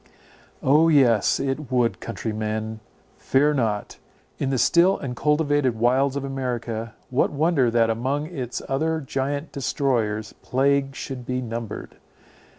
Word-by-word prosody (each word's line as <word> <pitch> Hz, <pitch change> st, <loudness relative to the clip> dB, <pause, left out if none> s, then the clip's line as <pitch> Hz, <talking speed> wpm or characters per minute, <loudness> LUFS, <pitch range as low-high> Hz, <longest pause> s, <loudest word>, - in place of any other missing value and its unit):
O, 150 Hz, +5 st, +5 dB
yes, 125 Hz, -9 st, +4 dB
it 135 Hz, 0 st, -3 dB
would—Countrymen, 110 Hz, -2 st, -2 dB, 0.4 s
fear 145 Hz, +3 st, +3 dB
not! 110 Hz, -7 st, -2 dB, 0.4 s
In 135 Hz, -, 0 dB
the 135 Hz, -, 0 dB
still 175 Hz, +9 st, +4 dB
uncultivated 145 Hz, 0 st, +1 dB
wilds 130 Hz, +4 st, +2 dB
of 140 Hz, -, -2 dB
America, 120 Hz, -4 st, -4 dB, 0.2 s
what 130 Hz, -, +2 dB
wonder 145 Hz, -4 st, +2 dB
that 115 Hz, -1 st, +3 dB
among 135 Hz, +6 st, -1 dB
its 130 Hz, -7 st, -5 dB
other 160 Hz, +4 st, 0 dB
giant 140 Hz, +2 st, -3 dB
destroyers, 120 Hz, -6 st, -1 dB
plague 135 Hz, +1 st, +1 dB
should 130 Hz, -4 st, -6 dB
be 125 Hz, +1 st, -2 dB
numbered! 115 Hz, -2 st, -6 dB
130 Hz, 120 wpm, -24 LUFS, 115-140 Hz, 0.4 s, O